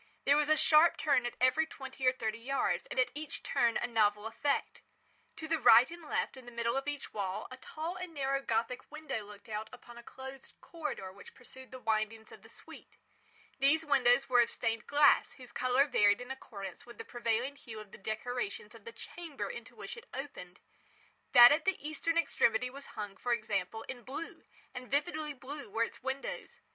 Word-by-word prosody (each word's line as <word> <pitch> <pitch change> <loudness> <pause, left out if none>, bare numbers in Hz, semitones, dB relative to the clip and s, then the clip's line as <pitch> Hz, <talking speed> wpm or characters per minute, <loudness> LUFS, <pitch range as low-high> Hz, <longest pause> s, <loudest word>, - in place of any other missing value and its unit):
There 280 - +6
was 300 0 +2
a 310 - +5
sharp 315 +2 +6
turn 275 -5 +2
at - - -7
every 255 +6 +3
twenty 265 -3 -5
or - - +7
thirty 230 -3 -3
yards, 270 +4 -1
and - - -3
at 255 - +3
each 300 0 -5
turn 235 -1 +2
a - - -1
novel 210 -3 +2
effect. 275 +6 -1 0.5
To 315 - -7
the 325 0 +1
right 245 +2 +7
and 340 0 -9
left, 305 - -2
in 260 -2 -12
the - - -8
middle 235 0 -1
of 270 +1 -2
each 290 -1 -5
wall, 195 -3 -3
a 255 - -8
tall 320 +6 -5
and 365 -1 -6
narrow 275 -2 -1
Gothic 235 +1 -2
window 305 -8 -4
looked 205 +1 -13
out 215 0 -4
upon 240 -1 -12
a - - -12
closed 265 +2 -10
corridor 300 - -5
which 200 - -14
pursued 260 0 -13
the 260 - -8
windings 220 -1 -1
of - - -13
the - - -16
suite. - - -13 0.6
These 300 +4 +3
windows 265 -2 +4
were 245 -2 +5
of 235 - +2
stained 230 -1 -2
glass 290 0 +5
whose 250 -2 -11
colour 255 +2 +3
varied 205 -7 +4
in 250 +1 -7
accordance 200 -8 -8
with 240 0 -13
the - - -7
prevailing 240 +3 -1
hue 230 -6 -10
of 210 -2 -11
the - - -12
decorations 215 +1 -4
of 225 -3 -15
the 230 - -7
chamber 335 -4 -7
into - - -10
which 470 - -7
it 470 0 -13
opened. 255 -10 -7 0.7
That 240 -1 +11
at 305 +2 +2
the 385 -1 +2
eastern 315 +2 -2
extremity 250 -6 +2
was 280 +1 -10
hung, 205 -2 -5
for 245 +4 0
example 215 -1 -2
in 255 -2 -8
blue—and 255 -1 -9
vividly 300 +1 -1
blue 280 0 -8
were 225 +3 +1
its - - -6
windows. 265 +1 -5
255 Hz, 200 wpm, -32 LUFS, 225-285 Hz, 0.7 s, That